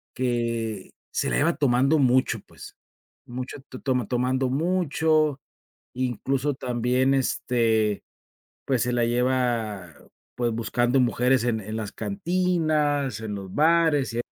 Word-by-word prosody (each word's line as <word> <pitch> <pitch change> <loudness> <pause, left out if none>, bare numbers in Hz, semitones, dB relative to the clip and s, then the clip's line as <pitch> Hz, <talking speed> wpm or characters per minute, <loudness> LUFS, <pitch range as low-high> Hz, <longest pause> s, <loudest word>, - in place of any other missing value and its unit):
que 115 -5 -2 0.2
se - - -1
la - - 0
lleva 165 +3 +2
tomando 135 +2 +3
mucho, 130 -1 +2
pues, - - -13 0.5
mucho 125 +3 -6
t 130 - -9
toma 125 -5 -1
tomando 130 +1 0
mucho, 155 -2 +1 0.5
incluso 130 +3 -1
también, 125 +2 +1
este, 115 -5 +1 0.6
pues, 130 -4 +1
se 125 0 0
la 120 -1 +2
lleva, 120 -7 0 0.4
pues 120 -1 0
buscando 120 +3 +1
mujeres 125 +1 +2
en 115 -2 0
en 110 +2 -6
las 110 -2 -4
cantinas, 155 - 0
en 105 -2 -5
los 95 -2 -8
bares 155 -5 +3
y 120 - 0
125 Hz, 125 wpm, -25 LUFS, 115-145 Hz, 0.6 s, tomando